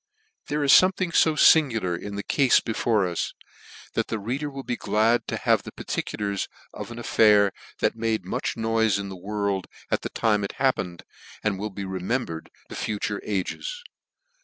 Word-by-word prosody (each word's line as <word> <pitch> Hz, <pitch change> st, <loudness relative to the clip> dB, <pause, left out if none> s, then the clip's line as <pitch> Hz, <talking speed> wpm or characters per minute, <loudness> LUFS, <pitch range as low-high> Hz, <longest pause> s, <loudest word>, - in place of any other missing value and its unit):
HPHERE 150 Hz, 0 st, 0 dB
is 135 Hz, -, +5 dB
fomething 185 Hz, -2 st, +5 dB
fo 160 Hz, -1 st, +4 dB
fingular 115 Hz, -, +4 dB
in 100 Hz, +3 st, -6 dB
the 100 Hz, -, -4 dB
cafe 135 Hz, -3 st, +1 dB
T -, -, +6 dB
before 110 Hz, -3 st, +1 dB
us, 85 Hz, -1 st, -3 dB, 0.6 s
that -, -, 0 dB
the 110 Hz, -, -2 dB
reader 130 Hz, +8 st, -3 dB
will 135 Hz, -1 st, -7 dB
be 120 Hz, -, -2 dB
glad 115 Hz, +1 st, +1 dB
to -, -, -2 dB
have -, -, +2 dB
the -, -, -9 dB
particulars 100 Hz, -2 st, -3 dB, 0.3 s
of -, -, -7 dB
an 120 Hz, -, -8 dB
affair 105 Hz, -3 st, +4 dB, 0.3 s
that -, -, +2 dB
made 110 Hz, -4 st, -1 dB
much 95 Hz, -, -2 dB
noife 110 Hz, -2 st, +2 dB
in 100 Hz, -1 st, -5 dB
the 95 Hz, -, -7 dB
world 100 Hz, 0 st, -2 dB, 0.2 s
at -, -, +1 dB
the -, -, -4 dB
time 105 Hz, -2 st, +1 dB
it 100 Hz, -, -4 dB
happened, 95 Hz, -10 st, -1 dB, 0.4 s
and 100 Hz, -3 st, 0 dB
will 105 Hz, +2 st, -3 dB
be 100 Hz, 0 st, -6 dB
remembered 95 Hz, -2 st, -3 dB, 0.2 s
to -, -, -7 dB
future 105 Hz, -1 st, -2 dB
ages. 480 Hz, -, -3 dB
110 Hz, 180 wpm, -25 LUFS, 100-120 Hz, 0.6 s, T